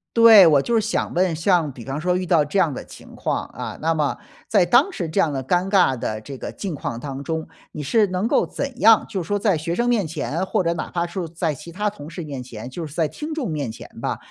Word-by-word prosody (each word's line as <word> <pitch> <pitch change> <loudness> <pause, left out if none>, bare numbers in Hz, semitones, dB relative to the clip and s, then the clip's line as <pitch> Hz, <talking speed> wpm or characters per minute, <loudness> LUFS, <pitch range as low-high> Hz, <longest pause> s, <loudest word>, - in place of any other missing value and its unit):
对， 225 -5 +9
我 145 -4 +5
就 235 - -2
是 230 - +5
想 220 +2 -1
问， 180 -2 +1
像 165 -1 +2
比 120 - -10
方 135 +3 -4
说 180 +3 +1
遇 185 0 -1
到 165 -4 +3
这 150 +7 -3
样 165 -6 +3
的 - - -7
情 - - -14
况， - - -1
啊， - - -7
那 165 +2 +2
么 150 -3 0 0.3
在 200 -5 +4
当 245 - +4
时 175 - -4
这 175 - -1
样 160 -6 +2
的 135 -1 -3
尴 180 +7 +1
尬 180 - +3
的 110 -1 -3
这 135 +5 -8
个 - - -6
境 195 -4 -5
况 130 -5 -4
当 135 +2 -6
中。 160 +2 -3 0.3
你 150 - -5
是 215 - +3
能 185 +2 -2
够 - - +2
怎 275 -3 -5
样， 225 0 +6
就 200 -4 -2
是 165 - -8
说 205 - +1
在 200 -4 +2
学 165 +3 -3
生 240 +3 +1
面 220 -8 +1
前， 160 +3 -3
或 190 - 0
者 170 - +1
哪 - - -4
怕 170 -1 -1
是 175 0 -4
在 165 -1 -2
其 145 - -10
他 205 +5 -1
同 150 -7 -10
事 170 +1 -6
面 140 -4 -6
前， 120 -1 -8
就 160 +5 -6
是 145 - -12
在 160 -3 +1
听 300 - -6
众 280 - -3
面 145 -5 -2
前 110 - -10
吧， - - -2
170 Hz, 290 characters per minute, -22 LUFS, 150-200 Hz, 0.3 s, 对